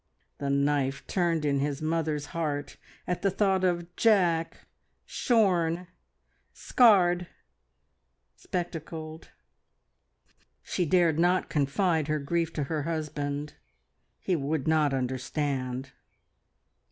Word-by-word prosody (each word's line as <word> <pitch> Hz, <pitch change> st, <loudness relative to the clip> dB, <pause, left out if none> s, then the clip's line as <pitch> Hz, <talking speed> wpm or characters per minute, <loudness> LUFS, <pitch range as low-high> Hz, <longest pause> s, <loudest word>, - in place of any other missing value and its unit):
The 140 Hz, 0 st, -2 dB
knife 140 Hz, -1 st, 0 dB
turned 170 Hz, -4 st, 0 dB
in 140 Hz, -1 st, +1 dB
his 140 Hz, 0 st, -1 dB
mother's 155 Hz, -2 st, -1 dB
heart 150 Hz, -4 st, -3 dB, 0.3 s
at 180 Hz, -, -2 dB
the 195 Hz, -, +2 dB
thought 195 Hz, -1 st, +1 dB
of 175 Hz, -1 st, -1 dB
Jack 175 Hz, -7 st, +2 dB, 0.4 s
shorn, 180 Hz, -7 st, +1 dB, 0.7 s
scarred, 180 Hz, -7 st, +4 dB, 1.1 s
spectacled. 160 Hz, -3 st, -6 dB, 1.3 s
She 180 Hz, -3 st, -1 dB
dared 170 Hz, -2 st, +3 dB
not 180 Hz, +2 st, +2 dB
confide 155 Hz, +2 st, +1 dB
her 155 Hz, 0 st, 0 dB
grief 165 Hz, +3 st, -1 dB
to 150 Hz, -, -2 dB
her 150 Hz, +2 st, -2 dB
husband. 150 Hz, -2 st, -3 dB, 0.6 s
He 185 Hz, -, -1 dB
would 150 Hz, -1 st, -2 dB
not 155 Hz, -2 st, +3 dB
understand. 130 Hz, 0 st, -2 dB
160 Hz, 100 wpm, -28 LUFS, 145-175 Hz, 1.3 s, scarred